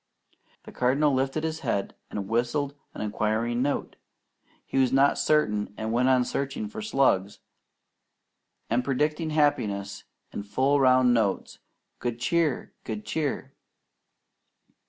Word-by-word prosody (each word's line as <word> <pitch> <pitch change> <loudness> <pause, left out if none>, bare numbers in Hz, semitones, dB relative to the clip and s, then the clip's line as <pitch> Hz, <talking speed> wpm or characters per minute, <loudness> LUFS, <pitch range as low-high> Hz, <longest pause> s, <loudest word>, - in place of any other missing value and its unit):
The - - -11
Cardinal 140 +4 +2
lifted 135 +4 0
his 160 0 -2
head 100 - -2 0.2
and 100 -2 -4
whistled 125 +6 0 0.2
an - - -6
inquiring 110 +3 0
note. 140 +2 -2 0.7
He 135 - -1
was 130 -2 +3
not 135 +1 +4
certain, 105 -10 +1
and 110 0 -3
went 125 +2 +3
on 130 -1 +4
searching 140 - -3
for 220 0 -7
slugs, 130 - +1 1.3
and 120 +2 +1
predicting 150 +4 0
happiness 105 -10 0 0.3
in - - -4
full 130 +8 +1
round 130 -2 +5
notes: 110 -5 0 0.4
"Good 120 -1 -3
Cheer! 160 0 0
Good 110 -2 -5
Cheer!" 140 -3 -2
130 Hz, 125 wpm, -27 LUFS, 110-145 Hz, 1.3 s, round